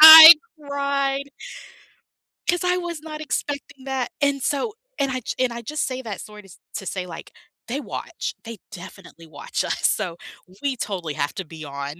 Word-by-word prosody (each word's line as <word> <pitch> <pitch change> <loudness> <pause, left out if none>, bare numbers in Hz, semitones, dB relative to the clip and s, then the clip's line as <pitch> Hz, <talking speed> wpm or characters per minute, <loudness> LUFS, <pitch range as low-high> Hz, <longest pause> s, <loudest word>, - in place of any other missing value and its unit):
I 320 +1 +14 0.3
cried 280 -1 -1 1.2
'cause 350 0 +2
I 360 0 +3
was 345 -3 -4
not 305 -1 -7
expecting 285 -2 -4
that, 265 -3 -2
and 280 -2 +1
so 410 +10 -1 0.2
and 275 -1 +1
I 255 0 -2
j - - -4
and 245 - 0
I 235 0 -6
just 300 +5 -2
say 260 0 -4
that 215 -4 -6
sort 210 -1 -11
of 190 - -15 0.2
to 195 - -5
say 185 -1 -3
like, 165 -2 -9 0.4
they 270 +5 -2
watch, - - -5
they 225 -2 -8
definitely 180 -2 -11
watch 145 -2 -3
us, - - 0
so 180 -6 -1 0.5
we 275 -2 0
totally 180 -9 -3
have 145 0 -2
to 190 - -3
be 160 0 -10
on, 140 0 -5
260 Hz, 180 wpm, -23 LUFS, 190-285 Hz, 1.2 s, I